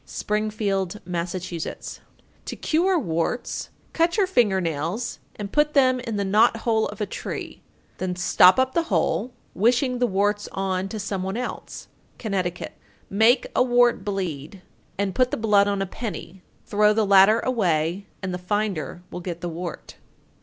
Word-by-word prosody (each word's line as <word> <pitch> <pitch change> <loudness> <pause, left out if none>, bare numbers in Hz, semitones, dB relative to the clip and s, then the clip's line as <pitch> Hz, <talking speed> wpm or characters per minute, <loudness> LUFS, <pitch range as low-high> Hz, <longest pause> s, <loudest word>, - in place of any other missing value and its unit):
Springfield, 210 -2 -2
Mass. 175 0 -3
903. 175 -3 -6 0.4
To - - -5
cure 355 +4 +1
warts: 170 - -2 0.2
Cut 335 +3 +2
your 405 - +4
finger 235 - +2
nails 170 +7 -3 0.2
and 205 -1 -6
put 300 0 +2
them 255 -2 +4
in 230 -3 -4
the 200 -1 -1
knothole 220 +2 +3
of 210 - -9
a - - +1
tree; 195 - -6 0.4
then 185 -1 -2
stop 180 +2 +5
up 260 0 +2
the 335 - +3
hole, 245 +5 0 0.2
wishing 245 +4 +2
the 245 - +3
warts 205 +1 0
on 190 0 -2
to 220 - -5
some 200 -2 -3
one 190 +3 -3
else. 250 0 -6 0.3
Connecticut. 185 -5 -3 0.4
904. - - -6
Make 225 +5 +4
a - - +4
wart 245 -1 +3
bleed, 185 -3 -4 0.3
and 200 -1 -1
put 255 -1 +2
the - - -2
blood 210 -3 +3
on 200 -1 0
a - - -3
penny, 190 -3 -7 0.2
throw 210 +1 +3
the 215 0 +2
latter 200 +3 +6
away, 185 -6 0 0.2
and 185 -1 -2
the 180 - -4
finder 180 -4 -2
will - - -5
get 170 -1 -6
the 175 - -3
wart. 170 +1 -7
205 Hz, 165 wpm, -24 LUFS, 185-235 Hz, 0.4 s, latter